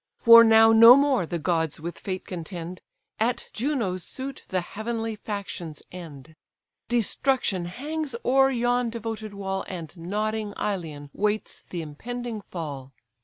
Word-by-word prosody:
For 230 -1 +9
now 225 0 +7
no 230 +2 +10
more 275 - +2
the 170 - -2
gods 160 -1 -1
with 170 +2 -6
fate 185 -1 -5
contend, 175 0 -7 0.4
At 235 +3 -1
Juno's 225 - -1
suit 265 +6 -6
the 185 -1 -1
heavenly 225 +4 -4
factions 200 -7 -6
end. 160 -4 -10 0.5
Destruction 240 -4 0
hangs 285 - -4
o'er 270 +1 +5
yon 245 -1 +1
devoted 225 -2 -6
wall, 190 -1 -3
And 170 -4 -7
nodding 210 +4 -2
Ilion 155 -8 -4
waits 210 +1 -2
the 170 -2 -4
impending 230 +9 -6
fall. 140 -8 -7
210 Hz, 130 wpm, -25 LUFS, 175-235 Hz, 0.5 s, no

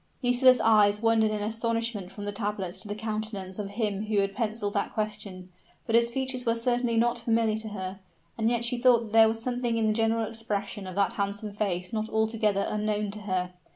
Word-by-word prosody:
Nisida's 250 +1 +5
eyes 210 -2 +4
wandered 225 -1 +4
in 210 -1 -2
astonishment 225 -2 -2
from 205 - -7
the 205 - -2
tablets 200 -3 -3
to - - -8
the 205 - -4
countenance 215 -3 -4
of 200 -1 -4
him 205 -1 -2
who 215 -1 0
had 195 0 +1
penciled 215 -2 -2
that 200 - -1
question; 210 -4 -4 0.4
but 225 - -3
his 235 0 +5
features 260 0 -2
were 230 -1 +1
certainly 240 0 0
not 240 +1 +2
familiar 225 -2 +1
to 220 0 -4
her 190 -2 -6 0.4
and 225 0 +1
yet 235 0 +1
she 240 +1 +1
thought 245 -2 +5
that 220 -2 -8
there 225 0 +7
was 225 0 +2
something 245 -2 -1
in 225 - +1
the 215 - +2
general 225 0 +1
expression 210 -3 -4
of 185 - -7
that 200 0 +1
handsome 200 +1 -3
face 190 -1 -2
not 220 0 -2
altogether 220 -2 +1
unknown 210 -1 -1
to 210 - -6
her. 185 -3 -2
215 Hz, 210 wpm, -27 LUFS, 205-230 Hz, 0.4 s, there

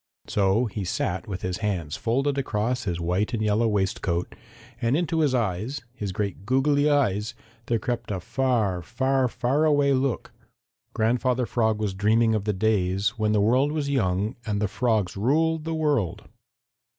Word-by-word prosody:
So 100 +4 +2
he 105 -2 -4
sat 90 0 -2
with 95 -3 -5
his 90 0 -2
hands 90 -9 -2
folded 135 +5 0
across 120 -1 -1
his 85 -3 -2
white 90 +7 0
and 110 - -2
yellow 105 +2 +2
waistcoat, 95 -4 -1 0.5
and 120 +4 +2
into 165 -1 0
his 145 -5 +2
eyes, 110 +4 -2
his 105 -6 -4
great 100 0 -3
goggly 140 +5 +2
eyes, 105 -8 +1 0.3
there 115 - +2
crept 120 -1 -3
a 100 -3 -2
far, 110 -4 0
far, 130 +7 +1
far 130 +5 0
away 145 -2 +3
look. 130 -3 -1 0.6
Grandfather 125 +2 +1
Frog 110 -2 0
was 105 -3 -1
dreaming 110 +4 +3
of 105 -2 -1
the 105 - +1
days 100 -1 +1
when 105 0 +2
the 105 - +3
world 130 +7 +3
was 150 -2 -2
young 105 -3 0
and 105 -3 -2
the 105 - +1
frogs 110 -3 0
ruled 155 +9 +1
the 165 0 -2
world. 115 - 0
110 Hz, 165 wpm, -25 LUFS, 100-130 Hz, 0.6 s, away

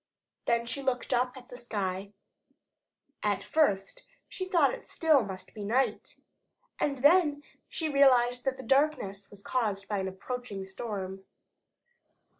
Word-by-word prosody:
Then 235 0 +2
she 275 +4 -3
looked 260 -1 -1
up 250 +1 +1
at 250 -1 -13
the 245 - -9
sky. 200 -4 -3 1.1
At 205 -2 0
first 195 -12 +1 0.2
she 370 - -4
thought 335 -8 +3
it - - -3
must - - -16
still 315 -4 +4 0.3
be 210 - -7
night, 245 +6 0 0.6
and 280 -1 0
then 295 -2 +5 0.3
she 320 - -1
realized 250 -4 +4
that 265 -1 0
the 260 - -8
darkness 265 -9 +1
was 200 -1 -12
caused 210 -6 -1
by 205 -2 -1
an 190 - -2
approaching 200 +1 -5
storm. 190 -1 -5
245 Hz, 140 wpm, -30 LUFS, 200-275 Hz, 1.1 s, then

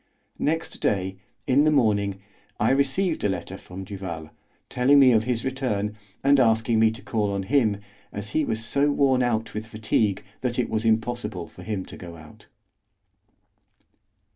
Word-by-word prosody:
Next 160 +2 -1
day, 95 -1 0 0.3
in 135 +2 +4
the 155 - +4
morning, 100 -8 +1 0.4
I 110 - +3
received 140 +6 +1
a 105 - +2
letter 95 0 -4
from 95 0 -9
Duval, 90 -5 -7 0.4
telling 130 +3 +3
me 130 -2 +7
of 110 -2 +3
his 120 -1 -1
return, 110 -6 -2 0.3
and 140 0 +5
asking 115 -1 +3
me 110 0 +5
to 110 +3 -8
call 105 -3 -1
on 100 -1 -2
him, 115 -2 +2 0.3
as 100 0 -5
he 155 - +1
was 115 -4 0
so 140 +4 +2
worn 135 -3 +3
out 115 -2 -1
with 110 +1 -5
fatigue 110 -2 0 0.2
that 120 -1 -2
it 125 - -1
was 110 +1 -1
impossible 110 -5 -1
for 90 - -14
him 95 -1 -4
to - - -11
go 85 -1 -9
out. 75 -1 -15
110 Hz, 165 wpm, -25 LUFS, 100-130 Hz, 0.4 s, me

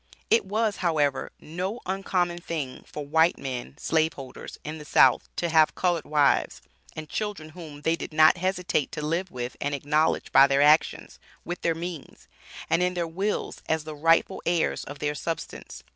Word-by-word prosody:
It 230 - +4
was, 210 +1 0
however, 150 -6 0
no 185 +8 -4
uncommon 180 -2 -1
thing 155 -7 -5
for 150 - -7
white 160 +4 +3
men 130 +1 -6
(slave 160 0 +1
holders) 135 -2 -9
in 155 +1 -6
the - - -8
South 130 -3 +4
to 170 - -1
have 160 -1 +4
colored 175 -3 0
wives 150 -2 +2 0.4
and 155 -1 -6
children 205 -7 -4
whom, 155 -3 -11
they 165 +1 +2
did - - -7
not 155 +2 +6
hesitate 180 -5 -1
to 150 -1 -4
live 170 +4 -1
with 125 -3 -5
and 145 0 -1
acknowledge 150 +3 0
by 135 +1 +7
their 140 +1 +3
actions, 150 +2 +2 0.3
with 175 0 -5
their 165 -1 +1
means, 170 -3 -8 0.4
and 170 - +2
in 180 0 +1
their 175 -1 -1
wills 190 +6 -3
as 160 -1 +1
the 155 0 -7
rightful 165 +3 +2
heirs 170 -1 0
of 145 - -8
their 150 0 -1
substance. 165 +3 -6
160 Hz, 175 wpm, -26 LUFS, 150-175 Hz, 0.4 s, by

